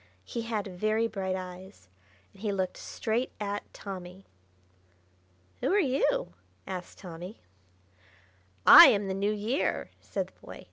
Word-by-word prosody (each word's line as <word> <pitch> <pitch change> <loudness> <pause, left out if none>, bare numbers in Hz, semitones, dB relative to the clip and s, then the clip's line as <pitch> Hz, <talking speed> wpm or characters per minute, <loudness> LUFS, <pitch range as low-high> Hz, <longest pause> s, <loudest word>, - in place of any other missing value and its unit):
He 235 - -4
had 225 -3 -3
very 215 +4 0
bright 190 -4 -3
eyes, 185 - -9 0.5
and 195 - -18
he 210 -2 -1
looked 190 -2 -2
straight 230 +3 -2
at 205 -1 -4
Tommy. 185 -1 -9 1.3
"Who - - 0
are 405 - +4
you?" 280 - +1 0.3
asked 180 -1 -7
Tommy. 180 +2 -9 1.3
"I - - +12
am 200 -1 +2
the 190 - -2
New 200 +2 0
Year!" 215 +7 -1
said - - -3
the - - -31
boy. - - -10
200 Hz, 135 wpm, -29 LUFS, 185-220 Hz, 1.3 s, I